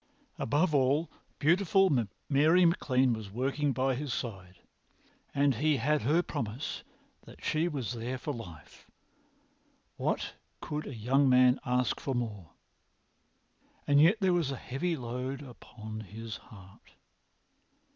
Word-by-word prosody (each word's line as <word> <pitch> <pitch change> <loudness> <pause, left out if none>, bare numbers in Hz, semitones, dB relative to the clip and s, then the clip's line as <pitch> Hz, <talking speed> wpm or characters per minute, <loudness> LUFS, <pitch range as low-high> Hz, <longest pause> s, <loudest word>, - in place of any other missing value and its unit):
Above 155 +7 +1
all, 140 +4 +2 0.3
beautiful 190 +4 +3 0.4
Mary 155 +6 +5
MacLean 130 -7 +2
was 110 -3 -6
walking 135 +6 -1
by 130 +1 +1
his 140 +1 -4
side, 95 -7 -5 0.8
and 140 0 +3
he 150 +4 +2
had 150 +4 +1
her 155 +9 +2
promise 115 +2 -4 0.5
that - - -14
she 155 +2 +1
was 135 - -3
there 120 +2 -4
for 145 +3 -4
life. 85 - -11 1.1
What - - -1 0.3
could 150 +1 -4
a 135 - -6
young 130 +5 +2
man 125 0 +5
ask 125 0 +1
for 135 - -3
more? 105 -8 -4 1.4
And 145 0 +5
yet 175 +8 +6
there 190 -3 +3
was 170 -5 +1
a 135 - -2
heavy 140 +8 -2
load 130 +3 -4
upon 110 -4 -9
his 110 +2 -7
heart. 95 -4 -16
130 Hz, 130 wpm, -30 LUFS, 115-150 Hz, 1.4 s, yet